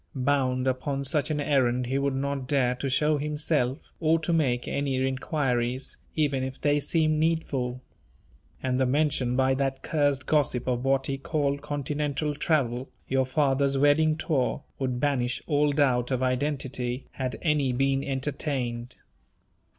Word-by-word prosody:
Bound 130 Hz, -1 st, +1 dB
upon 135 Hz, +2 st, -1 dB
such 140 Hz, +3 st, +1 dB
an 150 Hz, -1 st, -1 dB
errand 130 Hz, -4 st, +2 dB
he 135 Hz, +3 st, 0 dB
would 140 Hz, -1 st, 0 dB
not 140 Hz, -1 st, -2 dB
dare 130 Hz, -3 st, +2 dB
to 130 Hz, +2 st, -3 dB
show 150 Hz, +3 st, +2 dB
himself, 150 Hz, -2 st, -1 dB
or 160 Hz, 0 st, +3 dB
to 170 Hz, -, 0 dB
make 130 Hz, -7 st, +1 dB
any 140 Hz, -1 st, -1 dB
inquiries, 130 Hz, -1 st, -1 dB, 0.2 s
even 145 Hz, -4 st, +1 dB
if 130 Hz, +1 st, -5 dB
they 145 Hz, 0 st, +2 dB
seemed 155 Hz, 0 st, +1 dB
needful. 135 Hz, -6 st, -1 dB, 0.8 s
And 130 Hz, -1 st, 0 dB
the 130 Hz, -, +3 dB
mention 135 Hz, -3 st, +1 dB
by 130 Hz, 0 st, +3 dB
that 135 Hz, 0 st, -1 dB
cursed 145 Hz, -4 st, +1 dB
gossip 140 Hz, -5 st, +1 dB
of 125 Hz, -1 st, 0 dB
what 135 Hz, 0 st, +2 dB
he 135 Hz, 0 st, -2 dB
called 140 Hz, -1 st, -1 dB
"continental 145 Hz, +1 st, -2 dB
travel" 135 Hz, -5 st, 0 dB, 0.2 s
your 130 Hz, -1 st, +1 dB
father's 140 Hz, -1 st, +2 dB
wedding 155 Hz, +2 st, +4 dB
tour 140 Hz, -4 st, 0 dB, 0.2 s
would 130 Hz, -2 st, -1 dB
banish 125 Hz, -4 st, 0 dB
all 150 Hz, -1 st, +2 dB
doubt 130 Hz, -4 st, +2 dB
of 130 Hz, -1 st, 0 dB
identity, 130 Hz, -1 st, -2 dB
had 130 Hz, -2 st, -4 dB
any 150 Hz, -5 st, +2 dB
been 135 Hz, +2 st, +1 dB
entertained. 130 Hz, -3 st, -3 dB
135 Hz, 150 wpm, -27 LUFS, 130-145 Hz, 0.8 s, wedding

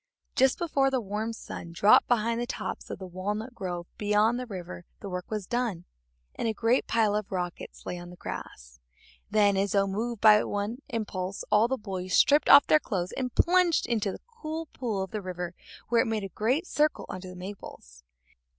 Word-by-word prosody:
Just 265 Hz, -1 st, +4 dB
before 280 Hz, -5 st, +1 dB
the 265 Hz, -1 st, 0 dB
warm 215 Hz, +1 st, -3 dB
sun 170 Hz, -6 st, -8 dB
dropped 200 Hz, +5 st, +5 dB
behind 230 Hz, 0 st, +1 dB
the 240 Hz, -, -2 dB
tops 260 Hz, -, -5 dB
of -, -, -5 dB
the 190 Hz, -, -8 dB
walnut 205 Hz, +6 st, -4 dB
grove 175 Hz, -5 st, -4 dB
beyond 210 Hz, +3 st, +2 dB
the 250 Hz, -, -5 dB
river 180 Hz, -4 st, -7 dB, 0.2 s
the 200 Hz, -, -7 dB
work 180 Hz, -1 st, -5 dB
was 215 Hz, -3 st, -3 dB
done, 230 Hz, -6 st, -2 dB, 0.5 s
and -, -, -2 dB
a 220 Hz, -, -1 dB
great 235 Hz, +4 st, +2 dB
pile 215 Hz, -3 st, +2 dB
of 210 Hz, -1 st, -3 dB
rockets 180 Hz, -2 st, -5 dB
lay 180 Hz, -, -4 dB
on 175 Hz, 0 st, -9 dB
the 180 Hz, -, -11 dB
grass. 65 Hz, -, -8 dB, 0.5 s
Then, 205 Hz, -2 st, +4 dB
as 195 Hz, 0 st, 0 dB
though 200 Hz, -1 st, +4 dB
moved 220 Hz, +4 st, -3 dB
by 210 Hz, 0 st, +7 dB
one 205 Hz, +4 st, -3 dB
impulse, 200 Hz, -4 st, -3 dB
all 210 Hz, +2 st, +5 dB
the 265 Hz, +2 st, -1 dB
boys 185 Hz, -4 st, -3 dB
stripped 290 Hz, +1 st, +5 dB
off 280 Hz, -, +10 dB
their 310 Hz, -, +5 dB
clothes 185 Hz, -9 st, -3 dB
and 255 Hz, -2 st, -4 dB
plunged 355 Hz, -1 st, +3 dB
into 215 Hz, -4 st, 0 dB
the -, -, -9 dB
cool 330 Hz, -9 st, -6 dB
pool 220 Hz, -6 st, -2 dB
of 190 Hz, -, -8 dB
the 215 Hz, -, -3 dB
river 180 Hz, -2 st, -5 dB, 0.4 s
where 235 Hz, 0 st, +4 dB
it -, -, -1 dB
made 220 Hz, -2 st, -1 dB
a 195 Hz, -, -5 dB
great 250 Hz, -, 0 dB
circle 305 Hz, -2 st, +1 dB
under 185 Hz, 0 st, -7 dB
the 180 Hz, -, -10 dB
maples. 180 Hz, -, -10 dB
210 Hz, 200 wpm, -28 LUFS, 185-240 Hz, 0.5 s, off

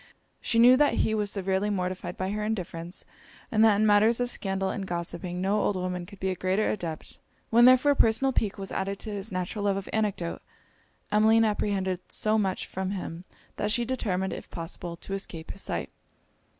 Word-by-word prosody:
She 230 Hz, -, 0 dB
knew 245 Hz, +2 st, +8 dB
that 295 Hz, +1 st, +3 dB
he 220 Hz, -, 0 dB
was 210 Hz, -2 st, 0 dB
severely 195 Hz, 0 st, 0 dB
mortified 185 Hz, -2 st, -3 dB
by 185 Hz, +1 st, -2 dB
her 210 Hz, 0 st, -2 dB
indifference, 180 Hz, -4 st, -4 dB, 0.5 s
and 220 Hz, 0 st, +4 dB
that 220 Hz, -2 st, +6 dB
in 215 Hz, +2 st, +2 dB
matters 215 Hz, +3 st, +4 dB
of 245 Hz, 0 st, 0 dB
scandal 195 Hz, -1 st, -2 dB
and 195 Hz, -3 st, -4 dB
gossiping 175 Hz, 0 st, -4 dB
no 200 Hz, +3 st, +1 dB
old 205 Hz, -, +1 dB
woman 180 Hz, -1 st, -3 dB
could 200 Hz, 0 st, -13 dB
be 190 Hz, 0 st, 0 dB
a -, -, -2 dB
greater 190 Hz, +4 st, 0 dB
adept. 170 Hz, -6 st, -5 dB, 0.3 s
When 235 Hz, +1 st, +7 dB
therefore 255 Hz, +3 st, +6 dB
personal 265 Hz, +1 st, +3 dB
pique 210 Hz, -5 st, 0 dB
was 195 Hz, -1 st, -6 dB
added 195 Hz, +1 st, -2 dB
to 220 Hz, -, -3 dB
his 205 Hz, +1 st, -4 dB
natural 185 Hz, +3 st, -3 dB
love 200 Hz, -1 st, +2 dB
of 195 Hz, -, -5 dB
anecdote, 205 Hz, -6 st, -1 dB, 0.7 s
Emmeline 220 Hz, +2 st, +5 dB
apprehended 195 Hz, -3 st, 0 dB
so 215 Hz, 0 st, +2 dB
much 190 Hz, -3 st, -1 dB
from 190 Hz, 0 st, -4 dB
him, 180 Hz, -3 st, -5 dB, 0.3 s
that 210 Hz, -, 0 dB
she 240 Hz, +2 st, +2 dB
determined, 190 Hz, -7 st, -1 dB
if -, -, -8 dB
possible, 170 Hz, 0 st, -6 dB
to 195 Hz, -, -7 dB
escape 170 Hz, -4 st, -4 dB
his 195 Hz, -, -8 dB
sight. -, -, -4 dB
195 Hz, 190 wpm, -27 LUFS, 185-215 Hz, 0.7 s, knew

